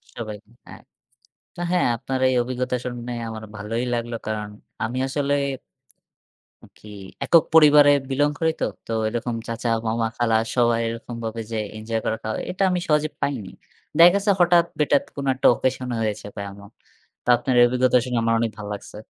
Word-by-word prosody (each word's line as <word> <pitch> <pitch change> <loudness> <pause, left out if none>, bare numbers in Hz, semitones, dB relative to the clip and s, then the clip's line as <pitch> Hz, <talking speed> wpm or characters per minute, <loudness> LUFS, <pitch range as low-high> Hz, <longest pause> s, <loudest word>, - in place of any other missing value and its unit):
সবাই, 110 -3 -6 0.3
হ্যাঁ। - - -12 0.7
তা - - -7
হ্যাঁ, 180 -6 +2
আপনার 130 +3 -3
এই - - +1
অভিজ্ঞতা 125 +1 -2
শুনে 120 0 -5 0.2
আমার 110 -1 -7
ভালোই 110 +3 -3
লাগলো। 120 0 -2
কারণ 105 -1 -3 0.4
আমি 120 +3 -4
আসলে 140 0 -1 1.4
কি 105 - -16 0.4
একক 165 -3 +5
পরিবারে 150 -2 +7 0.2
belong 145 +2 +1
করি 160 -1 +2
তো। - - +3 0.2
তো - - -7 0.2
এরকম 120 +1 -3
চাচা, 115 +1 -3 0.2
মামা, 115 +1 0
খালা 115 -2 +2 0.2
সবাই 120 -2 +3
এরকমভাবে 115 -1 -5
যে 115 - -2 0.2
এঞ্জয় 110 +1 -3
করাটা, 110 0 -2 0.2
এটা 190 +2 -1
আমি 180 - 0
সহজে 150 0 +2
পাইনি। 125 -9 -2 0.5
দেখা 170 +1 +9
গেছে 200 +1 +2
হঠাৎ-বেটাত 170 -5 +3
কোন 140 - -4
একটা 130 - +3
occasion 130 +1 -2
হয়েছে 105 -2 -2
বা 100 - -5
এমন। 100 +1 -13 0.5
তা - - -4
আপনার 130 - -1
এ - - +8
অভিজ্ঞতা 125 +1 +3
শুনে 125 -1 -2
আমার 115 - +2
অনেক 115 -1 0
ভালো 105 -1 -7
লাগছে। 100 - -9
120 Hz, 165 wpm, -23 LUFS, 115-145 Hz, 1.4 s, দেখা